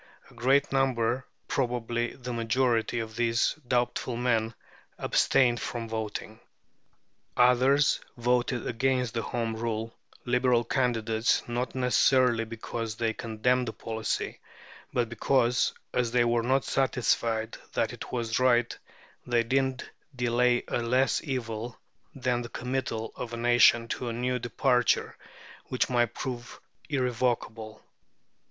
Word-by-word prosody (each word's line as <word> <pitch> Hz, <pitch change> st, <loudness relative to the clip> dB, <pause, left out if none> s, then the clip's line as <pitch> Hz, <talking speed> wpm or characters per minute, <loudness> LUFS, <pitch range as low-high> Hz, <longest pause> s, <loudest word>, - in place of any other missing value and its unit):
A -, -, -17 dB
great 135 Hz, +4 st, +2 dB
number, 130 Hz, -2 st, +1 dB, 0.2 s
probably 120 Hz, -2 st, -1 dB
the 125 Hz, -1 st, -6 dB
majority, 115 Hz, 0 st, +1 dB
of 110 Hz, -1 st, -4 dB
these 115 Hz, -1 st, +2 dB
doubtful 120 Hz, 0 st, 0 dB
men 115 Hz, -2 st, 0 dB, 0.4 s
abstained 120 Hz, -3 st, +3 dB
from 115 Hz, -1 st, -4 dB
voting. 110 Hz, -1 st, -5 dB, 1.0 s
Others 130 Hz, +4 st, +4 dB, 0.2 s
voted 120 Hz, +1 st, 0 dB
against 125 Hz, 0 st, 0 dB
the 115 Hz, -, -1 dB
Home 115 Hz, -1 st, -2 dB
Rule 115 Hz, 0 st, -3 dB, 0.3 s
Liberal 125 Hz, -1 st, +2 dB
candidates, 115 Hz, -2 st, 0 dB
not 120 Hz, +2 st, -3 dB
necessarily 125 Hz, -2 st, +3 dB
because 115 Hz, 0 st, -5 dB
they 115 Hz, 0 st, -1 dB
condemned 120 Hz, +3 st, 0 dB
the 110 Hz, -, -3 dB
policy, 110 Hz, -1 st, -3 dB, 0.5 s
but 120 Hz, -1 st, 0 dB
because, 120 Hz, +2 st, +2 dB, 0.2 s
as 125 Hz, -2 st, +1 dB
they 120 Hz, 0 st, +3 dB
were 120 Hz, 0 st, +2 dB
not 130 Hz, +3 st, +1 dB
satisfied 115 Hz, -4 st, 0 dB, 0.2 s
that -, -, 0 dB
it -, -, -8 dB
was 115 Hz, -2 st, -1 dB
right, 120 Hz, -2 st, +3 dB, 0.5 s
they 120 Hz, -1 st, +2 dB
deemed 130 Hz, +1 st, 0 dB, 0.3 s
delay 125 Hz, 0 st, +2 dB
a -, -, -1 dB
less 125 Hz, +3 st, +2 dB
evil 120 Hz, -4 st, -4 dB, 0.4 s
than 125 Hz, -2 st, 0 dB
the 120 Hz, -, -7 dB
committal 125 Hz, -3 st, -3 dB
of 125 Hz, -, -5 dB
the 120 Hz, -, -6 dB
nation 120 Hz, -1 st, +5 dB
to 125 Hz, -, -3 dB
a -, -, -3 dB
new 125 Hz, +2 st, -1 dB
departure, 125 Hz, 0 st, +1 dB, 0.5 s
which 125 Hz, 0 st, -1 dB
might 120 Hz, -1 st, +1 dB
prove 120 Hz, -2 st, -6 dB, 0.3 s
irrevocable. 120 Hz, -5 st, -1 dB
120 Hz, 125 wpm, -28 LUFS, 115-125 Hz, 1.0 s, nation